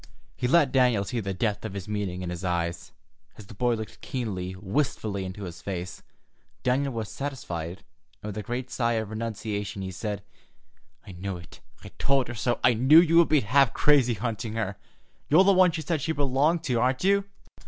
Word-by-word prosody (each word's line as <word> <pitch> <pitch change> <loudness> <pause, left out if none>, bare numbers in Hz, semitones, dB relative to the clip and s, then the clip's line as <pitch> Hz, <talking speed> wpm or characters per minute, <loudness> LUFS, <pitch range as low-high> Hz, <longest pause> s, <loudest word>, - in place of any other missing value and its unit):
He 125 - -1
let 145 -1 +4
Daniel 125 -6 +3
see 120 +4 -3
the 100 -3 -3
depth 105 +2 -1
of 105 -3 -5
his 100 -1 -6
meaning 100 -4 -3
in 90 - -4
his 90 +1 -6
eyes, 85 -1 -2 0.5
as 105 - -11
the 110 - -12
boy 120 +3 +1
looked 110 -1 -8
keenly, 95 -8 -4
wistfully, 100 -1 -2
into 95 +2 -7
his 85 -2 -8
face. 90 -2 -5 0.6
Daniel 135 +2 +1
was 110 -2 -3
satisfied, 95 - -5 0.4
and 105 - -4
with 105 - -6
a - - -2
great 125 +3 -4
sigh 120 -1 +1
of 110 -2 -2
renunciation, 110 -2 -4
he 95 - -4
said: 105 +2 -4 0.8
"I - - -9
knew 95 +1 -5
it, 85 - -13 0.2
I - - -9
told 135 -2 +2
her - - -4
so. 120 +2 -1
I 125 - +6
knew 130 +8 +7
you 165 -1 +4
would 170 - +5
be 150 -3 +4
half 125 +3 +3
crazy, 135 -5 +4
hunting 110 0 -3
her. 105 -3 -2 0.5
You're 160 +6 +7
the 200 0 +5
one 185 -1 +6
she 160 0 -4
said 160 -3 -1
she 160 - -1
belonged 145 +4 +1
to, 125 -7 0
aren't 130 +4 +1
you?" 200 +1 +3
115 Hz, 200 wpm, -27 LUFS, 100-135 Hz, 0.8 s, knew